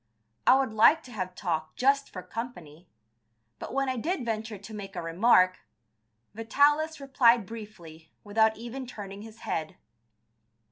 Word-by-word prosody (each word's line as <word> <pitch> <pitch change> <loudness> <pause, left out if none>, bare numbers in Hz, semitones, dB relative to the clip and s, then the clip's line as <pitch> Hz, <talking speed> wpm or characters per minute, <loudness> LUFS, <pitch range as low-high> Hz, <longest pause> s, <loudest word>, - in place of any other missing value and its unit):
I 260 - +8
would 265 -5 -1
liked 230 +9 +5
to 250 - -12
have 185 -4 -5
talked 160 -4 -3
just 275 +2 +2
for 185 - -8
company, 175 -9 -8 0.7
but - - -7
when 275 +1 0
I 260 -1 -1
did 300 +1 -2
venture 220 -1 -3
to 200 +3 -11
make 195 -2 -8
a - - -3
remark, 185 +2 +4 0.7
Vitalis 290 +8 +2
replied 245 -5 +3
briefly, 175 -8 -11
without 220 +1 +2
even 240 +3 -7
turning 200 -4 -8
his 225 +1 -12
head. 155 -1 -4
220 Hz, 145 wpm, -28 LUFS, 185-250 Hz, 0.7 s, I